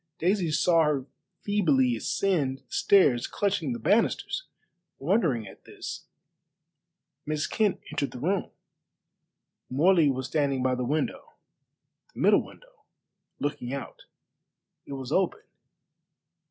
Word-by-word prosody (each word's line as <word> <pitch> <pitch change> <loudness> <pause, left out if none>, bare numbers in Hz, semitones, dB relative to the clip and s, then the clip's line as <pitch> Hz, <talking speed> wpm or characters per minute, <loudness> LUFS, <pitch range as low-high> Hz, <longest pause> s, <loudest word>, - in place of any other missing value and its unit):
Daisy 180 0 +1
saw 165 +2 +3
her 145 -4 0 0.4
feebly 145 - +2
ascend 140 - 0
the 135 - -27
stairs, 140 -12 +4
clutching 195 -8 -1
the 120 - -2
banisters. 225 - +1 0.5
Wondering 150 - +1
at 95 - -14
this, - - -8 1.2
Miss 155 0 -2
Kent 215 -3 0
entered 140 - -1
the 125 - -9
room. 185 +7 -1 1.2
Morley 160 +3 +4
was 130 -1 -2
standing 140 -3 0
by 130 0 +2
the 125 0 -2
window 150 +5 -2 0.8
the - - -9
middle - - +5
window - - -17 0.6
looking 140 -3 -3
out. 140 - -8 0.8
It - - -6
was 135 -1 -6
open. 185 +2 +1
150 Hz, 115 wpm, -27 LUFS, 130-190 Hz, 1.2 s, middle